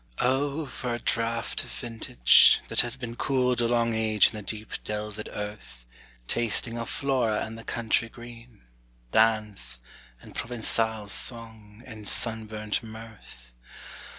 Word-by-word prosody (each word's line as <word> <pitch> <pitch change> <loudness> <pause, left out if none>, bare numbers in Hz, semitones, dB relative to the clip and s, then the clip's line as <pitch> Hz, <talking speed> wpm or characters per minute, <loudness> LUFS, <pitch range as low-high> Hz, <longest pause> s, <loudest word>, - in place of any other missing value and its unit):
O 140 +4 +1
for 125 -2 -4
a - - -3
draught 115 -1 -1
of - - -11
vintage, 110 - +5
that - - +4
hath 120 +3 -5
been 120 -2 -5
Cooled 125 -2 +1
a 120 - +2
long 115 -1 +2
age 110 -1 +4
in - - -13
the 105 - -6
deep 110 +1 -6
delved 105 0 -5
earth, 105 - -7 0.4
Tasting 115 0 +1
of 115 - -4
Flora 125 -6 0
and 110 - -8
the 115 - -10
country 115 0 0
green, 120 -1 -13 0.5
Dance, 105 - +2 0.4
and - - -14
Provençal 110 -2 0
song, 110 -1 -3
and 110 -4 -6
sunburnt 110 -2 -1
mirth! 110 - -12
115 Hz, 135 wpm, -27 LUFS, 105-120 Hz, 0.5 s, vintage